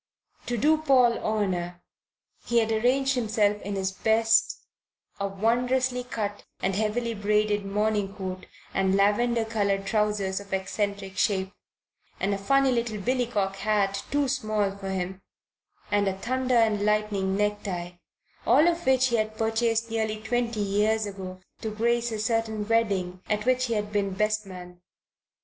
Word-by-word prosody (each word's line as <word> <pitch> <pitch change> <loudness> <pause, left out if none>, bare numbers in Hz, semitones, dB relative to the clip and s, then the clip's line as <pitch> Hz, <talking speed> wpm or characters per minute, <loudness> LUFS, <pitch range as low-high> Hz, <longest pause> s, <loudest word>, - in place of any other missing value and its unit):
To 240 - -1
do 310 +6 +3
Paul 255 -6 +4
honour 180 -5 -1 0.7
he 235 - +1
had 225 -1 +3
arrayed 250 +5 +2
himself 215 -5 +1
in 200 +1 -4
his 190 0 -1
best 225 +3 +2 0.6
a 200 - 0
wondrously 245 +5 0
cut 210 -4 -4 0.2
and 195 - 0
heavily 220 +3 -1
braided 210 -1 +1
morning 205 -1 0
coat 185 -1 -6 0.3
and 190 0 +2
lavender 225 +4 +2
coloured 200 -3 0
trousers 210 -2 0
of 200 0 -12
eccentric 195 0 -2
shape, 190 -1 +1 0.7
and 200 +1 0
a 200 - -2
funny 275 +6 +3
little 235 -3 -1
billycock 215 -3 -1
hat 200 -1 0
too 285 -1 +1
small 215 -6 -1
for 195 -1 -6
him, 190 0 -3 0.7
and 205 -1 +2
a 190 0 -1
thunder 255 +4 -1
and 215 -3 +3
lightning 210 -2 +1
necktie, 205 -4 -2 0.6
all 285 +8 +6
of 345 -2 0
which 260 0 +4
he 235 - +2
had 215 0 -2
purchased 225 0 0
nearly 220 -1 -1
twenty 230 0 -1
years 210 +2 +1
ago 190 -2 -7 0.2
to 220 - -2
grace 235 +2 0
a 220 - -2
certain 220 -1 -1
wedding 195 -6 0
at 210 0 0
which 255 0 +2
he 235 -2 -1
had 210 0 -2
been 200 -2 -1
best 215 0 0
man. 180 -1 -10
215 Hz, 150 wpm, -26 LUFS, 195-235 Hz, 0.7 s, all